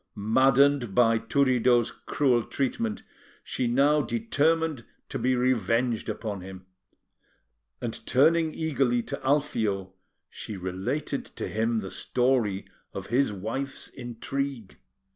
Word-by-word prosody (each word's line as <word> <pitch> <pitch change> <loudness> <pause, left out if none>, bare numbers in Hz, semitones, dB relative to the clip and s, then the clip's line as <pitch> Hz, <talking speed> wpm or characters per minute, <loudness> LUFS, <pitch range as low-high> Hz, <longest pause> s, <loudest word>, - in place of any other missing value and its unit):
Maddened 130 +2 +3
by 115 -2 +4
Turiddu's 125 -1 +2
cruel 130 -5 +1
treatment, 115 -3 -2 0.4
she 125 - -2
now 140 +5 +3
determined 165 - 0 0.3
to - - -4
be 130 +1 +2
revenged 120 -1 +1
upon 105 -4 -4
him, 95 0 -10 1.1
and, 115 -2 -5
turning 160 +4 +4
eagerly 135 -7 0
to - - -6
Alfio, 110 -9 0 0.3
she 105 - -7
related 95 +11 -3
to - - -6
him 110 +1 0
the 95 - -7
story 120 -6 0 0.3
of - - -5
his 135 -2 +3
wife's 115 +8 -4
intrigue. 125 -1 -5
125 Hz, 110 wpm, -27 LUFS, 110-140 Hz, 1.1 s, by